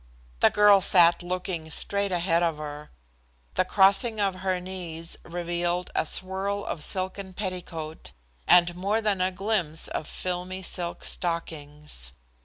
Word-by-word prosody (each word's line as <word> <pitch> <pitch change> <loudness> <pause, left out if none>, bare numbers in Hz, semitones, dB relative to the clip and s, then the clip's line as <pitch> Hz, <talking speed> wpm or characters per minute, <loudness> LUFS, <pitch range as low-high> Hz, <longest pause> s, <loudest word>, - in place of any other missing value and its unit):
The - - +6
girl 205 -1 +6
sat 175 -1 +5
looking 175 -2 -4
straight 200 +4 +1
ahead 170 -1 +1
of 165 -3 0
her. 150 0 -7 0.6
The - - +2
crossing 200 +4 +3
of 195 -2 0
her 185 -1 0
knees 175 -3 -6
revealed 175 +1 -2
a - - 0
swirl 195 +3 0
of 150 - -4
silken 190 +1 -2
petticoat, 175 -5 -5 0.4
and 175 -1 +5
more 200 +5 0
than 210 -4 0
a 185 - +2
glimpse 185 -5 -1
of 155 - -4
filmy 185 +1 -4
silk 175 -1 -3
stockings. 150 - -3
180 Hz, 135 wpm, -26 LUFS, 165-190 Hz, 0.6 s, The